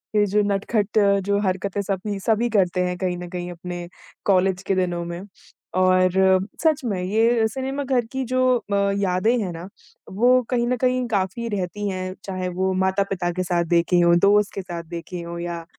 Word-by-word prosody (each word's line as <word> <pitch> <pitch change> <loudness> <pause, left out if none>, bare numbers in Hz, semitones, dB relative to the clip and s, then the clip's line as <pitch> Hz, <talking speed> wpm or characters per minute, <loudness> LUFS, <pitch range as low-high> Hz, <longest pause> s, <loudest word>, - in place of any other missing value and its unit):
ये 210 -1 +4
जो 205 +1 +2
नटखट 205 +1 -1
अ, 200 -1 +4
जो 200 +1 0
हरकतें 195 +1 -1
सभी 200 +1 -3
सभी 225 +4 +1
करते 185 -4 +2
हैं 180 0 -2
कहीं 180 -1 -2
न 180 0 -7
कहीं 175 0 -5
अपने 175 0 -7 0.4
कॉलेज 190 -1 +2
के 195 - +2
दिनों 175 -2 -1
में। 170 +1 -6 0.6
और 185 0 +4 0.5
सच 315 -2 +3
में 200 -6 -1
ये 225 +4 +2
सिनेमा 265 +4 -3
घर 255 -3 +1
की 265 0 -2
जो 255 0 +2
अ, 205 -3 -4 0.2
यादें 200 +4 +1
हैं 190 -4 -3
ना 170 +2 -8 0.5
वो 250 +1 +5
कहीं 240 -2 +1
न 250 +1 0
कहीं 255 0 +2
काफ़ी 195 +5 -1
रहती 205 0 -3
हैं, 185 -1 -4
चाहे 185 -1 -4
वो 190 0 +1
माता-पिता 190 -2 0
के 185 +1 -2
साथ 175 -1 0
देखी 170 +1 +3
हों, 170 0 +5
दोस्त 205 +2 +3
के 195 - -3
साथ 175 -2 -6
देखी 170 +1 -6
हों 170 0 -6
या 170 -1 -5
190 Hz, 190 wpm, -23 LUFS, 180-215 Hz, 0.6 s, वो